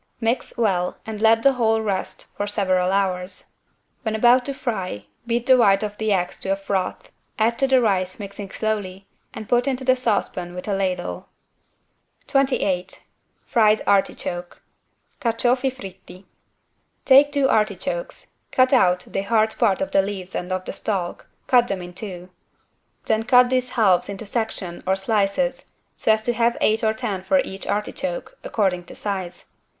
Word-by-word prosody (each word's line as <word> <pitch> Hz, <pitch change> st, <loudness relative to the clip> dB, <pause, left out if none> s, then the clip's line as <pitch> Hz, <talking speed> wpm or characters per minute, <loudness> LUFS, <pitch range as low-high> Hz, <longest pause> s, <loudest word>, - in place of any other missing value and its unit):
Mix 235 Hz, +2 st, -1 dB
well 190 Hz, -6 st, 0 dB
and 215 Hz, -1 st, -6 dB
let 225 Hz, 0 st, +4 dB
the 275 Hz, -, +6 dB
whole 225 Hz, -3 st, +2 dB
rest 195 Hz, -3 st, -3 dB
for 205 Hz, -, -3 dB
several 185 Hz, -3 st, +1 dB
hours. 190 Hz, -1 st, -2 dB, 0.4 s
When 220 Hz, -3 st, -2 dB
about 245 Hz, +3 st, +4 dB
to 275 Hz, -, -3 dB
fry, 190 Hz, -, -4 dB, 0.2 s
beat 235 Hz, 0 st, 0 dB
the 260 Hz, 0 st, +6 dB
white 200 Hz, -4 st, +4 dB
of 210 Hz, -1 st, -4 dB
the 220 Hz, -1 st, 0 dB
eggs 180 Hz, -2 st, 0 dB
to -, -, -5 dB
a 195 Hz, -, +3 dB
froth, 195 Hz, -1 st, -3 dB, 0.3 s
add 230 Hz, +2 st, +1 dB
to 270 Hz, -, +3 dB
the 265 Hz, -1 st, +4 dB
rice 185 Hz, -4 st, 0 dB
mixing 200 Hz, -1 st, -7 dB
slowly, 195 Hz, -3 st, -3 dB, 0.2 s
and 220 Hz, -, -8 dB
put 245 Hz, +2 st, +2 dB
into 260 Hz, -1 st, -1 dB
the 255 Hz, 0 st, +4 dB
saucepan 200 Hz, -7 st, -2 dB
with 180 Hz, -, -7 dB
a 205 Hz, -, 0 dB
ladle. 185 Hz, -2 st, -2 dB, 1.0 s
28 200 Hz, -9 st, 0 dB, 0.5 s
FRIED 215 Hz, -3 st, +3 dB
ARTICHOKE 180 Hz, -3 st, -1 dB, 0.6 s
(Carciofi 245 Hz, +2 st, +1 dB
fritti) 190 Hz, -5 st, -12 dB, 0.8 s
Take 280 Hz, +2 st, +7 dB
two 280 Hz, -2 st, +2 dB
artichokes, 215 Hz, -, -2 dB
cut 255 Hz, +1 st, +3 dB
out 180 Hz, -8 st, +4 dB
the 195 Hz, -, -4 dB
hard 220 Hz, +2 st, +1 dB
part 195 Hz, -, +2 dB
of 285 Hz, -, -5 dB
the 195 Hz, -, +4 dB
leaves 190 Hz, -2 st, -6 dB
and 180 Hz, +1 st, -4 dB
of 185 Hz, 0 st, -2 dB
the -, -, -5 dB
stalk, 185 Hz, -5 st, -3 dB, 0.2 s
cut 245 Hz, -2 st, +4 dB
them 190 Hz, -4 st, -3 dB
in 175 Hz, 0 st, -9 dB
two. 180 Hz, -2 st, -8 dB, 0.7 s
Then 220 Hz, 0 st, +1 dB
cut 250 Hz, +2 st, +5 dB
these 255 Hz, -1 st, +1 dB
halves 195 Hz, -4 st, +3 dB
into 200 Hz, +2 st, -6 dB
section 205 Hz, -5 st, -3 dB
or 190 Hz, -, +3 dB
slices 210 Hz, +6 st, -1 dB, 0.2 s
so -, -, +2 dB
as 220 Hz, 0 st, +2 dB
to 240 Hz, -, +1 dB
have 235 Hz, +1 st, +1 dB
eight 220 Hz, +2 st, +2 dB
or 220 Hz, 0 st, +2 dB
ten 215 Hz, -6 st, -3 dB
for 235 Hz, +10 st, +2 dB
each 195 Hz, -6 st, -7 dB
artichoke, 200 Hz, -3 st, -3 dB
according 185 Hz, -5 st, -1 dB
to -, -, -11 dB
size. 190 Hz, -4 st, -5 dB
210 Hz, 165 wpm, -22 LUFS, 190-240 Hz, 1.0 s, Take